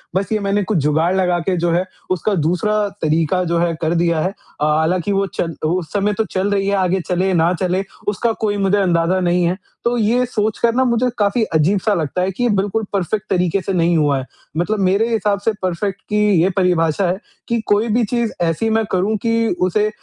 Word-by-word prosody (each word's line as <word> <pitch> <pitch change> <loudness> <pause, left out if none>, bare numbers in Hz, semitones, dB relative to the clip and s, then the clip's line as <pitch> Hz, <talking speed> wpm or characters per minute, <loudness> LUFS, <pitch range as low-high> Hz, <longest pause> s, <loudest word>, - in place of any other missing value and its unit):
बस 195 +2 -1
ये 215 - +1
मैंने 200 0 0
कुछ 195 +1 -1
जुगाड़ 160 +4 +2
लगा 180 -2 +2
के 180 +2 -1
जो 170 0 +1
है 175 +2 +1 0.3
उसका 185 +3 0
दूसरा 190 +6 +1
तरीका 160 +4 +1
जो 170 -1 0
है 170 0 +1
कर 160 0 +1
दिया 170 -1 +1
है। 185 - 0 0.3
अ, - - +3
हालाँकि 175 +4 0
वो 195 0 +1
चल 165 -2 -2
उस 170 +1 -1
समय 205 0 +1
तो 220 - +2
चल 190 +1 0
रही 195 -1 0
है 200 - +2
आगे 190 -1 +1
चले 185 +1 +1
ना 170 +1 +3
चले 185 +1 0 0.2
उसका 210 +3 +1
कोई 205 -2 0
मुझे 195 0 +2
अंदाज़ा 180 -1 +2
नहीं 175 0 +1
है। 175 +2 0 0.3
तो 240 +1 +1
ये 235 +3 +2
सोचकर 220 0 0
ना 260 - +3
मुझे 235 0 +1
काफ़ी 210 +2 +1
अजीब-सा 190 +7 +2
लगता 170 0 -1
है 185 +1 0
कि 220 +6 -4
ये 245 - +2
बिल्कुल 205 +1 0
परफेक्ट 200 +2 -1
तरीके 180 +1 +1
से 195 - -3
नहीं 170 -1 +2
हुआ 145 -3 +2
है, 130 - -6 0.3
मतलब 205 +5 0
मेरे 195 +4 +2
हिसाब 210 -2 +1
से 225 - +4
परफेक्ट 190 +2 -2
की 210 0 +2 0.2
ये 180 - +3
परिभाषा 180 -1 +2
है 180 +2 0 0.3
कि 235 0 0
कोई 205 +3 +2
भी 235 +2 +2
चीज़ 235 0 -1
ऐसी 170 +6 0
मैं 220 0 +2
करूँ 190 +4 +1
कि 230 0 +2 0.2
उसे 210 +4 +1
190 Hz, 220 wpm, -18 LUFS, 175-210 Hz, 0.3 s, से